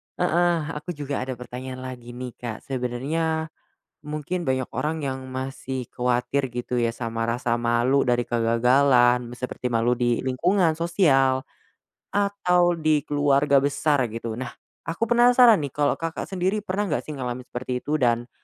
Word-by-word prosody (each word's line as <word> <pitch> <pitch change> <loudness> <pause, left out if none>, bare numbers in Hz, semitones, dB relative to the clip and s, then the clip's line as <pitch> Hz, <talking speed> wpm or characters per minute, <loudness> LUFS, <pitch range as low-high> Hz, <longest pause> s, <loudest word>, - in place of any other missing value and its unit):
heeh, 175 0 +2 0.2
aku 150 +3 -6
juga 145 -1 -3
ada 130 0 -4
pertanyaan 130 +1 -7
lagi 120 -2 -8
nih, 125 -1 -6
Kak. 115 -3 -6
Sebenarnya 150 +6 -2 0.5
mungkin 155 +4 -3
banyak 130 -1 -1
orang 155 +1 -2
yang 130 -1 -4
masih 130 -1 -5
kuatir 125 +1 -1
gitu 125 0 -3
ya, 115 -1 +1
sama 115 -1 -3
rasa 120 0 0
malu 120 +4 +2
dari 120 -1 +2
kegagalan, 120 +1 +3
seperti 125 -1 -4
malu 120 +1 +2
di 120 -1 +1
lingkungan 165 +5 +1
sosial, 140 -7 +3 0.7
atau 180 -4 +2
di 155 -2 +2
keluarga 145 -1 +2
besar 140 -1 +2
gitu. 115 0 -5
Nah, 130 -1 -5 0.3
aku 190 +7 -2
penasaran 240 -1 +6
nih 135 - -8
kalau 145 -1 +1
Kakak 165 0 -4
sendiri 190 +2 0
pernah 205 +1 -2
nggak - - -1
sih 150 - -5
ngalamin 125 -1 -4
seperti 125 0 -4
itu, 150 +2 -1
dan, 120 -2 +1
130 Hz, 150 wpm, -24 LUFS, 125-160 Hz, 0.7 s, penasaran